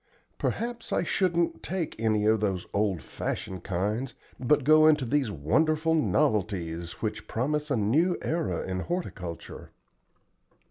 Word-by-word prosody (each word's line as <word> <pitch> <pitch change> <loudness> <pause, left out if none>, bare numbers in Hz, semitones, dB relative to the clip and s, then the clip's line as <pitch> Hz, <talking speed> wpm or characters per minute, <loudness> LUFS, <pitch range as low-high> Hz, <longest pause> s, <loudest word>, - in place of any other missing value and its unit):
Perhaps 235 0 -3
I - - +1
shouldn't 170 -3 +1
take 180 -3 -3
any 110 -2 +2
of 110 0 +4
those 95 -4 -1
old 100 -7 0
fashioned 95 +5 -4
kinds, 105 +8 -2 0.2
but 140 +3 +2
go 155 +2 +6
into 150 -4 +4
these 135 0 +1
wonderful 155 - +1
novelties 95 - 0
which 110 - -3
promise 150 +5 -1
a 140 - +1
new 150 - +2
era 100 - -1
in 95 0 -2
horticulture." 95 - -5
125 Hz, 130 wpm, -28 LUFS, 95-155 Hz, 0.2 s, go